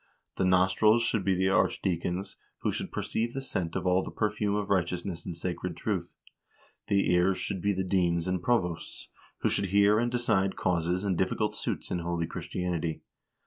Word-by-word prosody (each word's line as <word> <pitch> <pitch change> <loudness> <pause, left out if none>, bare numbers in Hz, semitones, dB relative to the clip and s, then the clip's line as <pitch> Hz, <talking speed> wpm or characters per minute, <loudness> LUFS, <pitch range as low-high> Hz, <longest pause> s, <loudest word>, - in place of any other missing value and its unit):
The 95 - +2
nostrils 95 +5 +4
should 110 -3 0
be 95 -1 +2
the 95 +1 +2
archdeacons, 90 0 0 0.2
who - - +1
should - - -4
perceive 115 +1 -2
the - - -1
scent 90 -10 -3
of - - -2
all 90 +1 +3
the - - -6
perfume 105 -1 0
of 105 -1 -2
righteousness 90 -1 -1
and 85 - -5
sacred 90 0 -4
truth. - - -3 0.7
The 100 -3 +2
ears 90 +2 +3
should 95 -3 -3
be 100 - +2
the 95 0 -1
deans 90 -2 +1
and 90 -1 0
provosts, 90 -9 -1 0.3
who - - +2
should 100 - 0
hear 100 +2 +4
and 120 +1 0
decide 110 -6 +1
causes 90 +1 0
and 100 -3 +1
difficult 105 +3 0
suits - - -3
in 90 - 0
holy 85 0 -1
Christianity. 85 -1 -3
95 Hz, 180 wpm, -29 LUFS, 90-100 Hz, 0.7 s, nostrils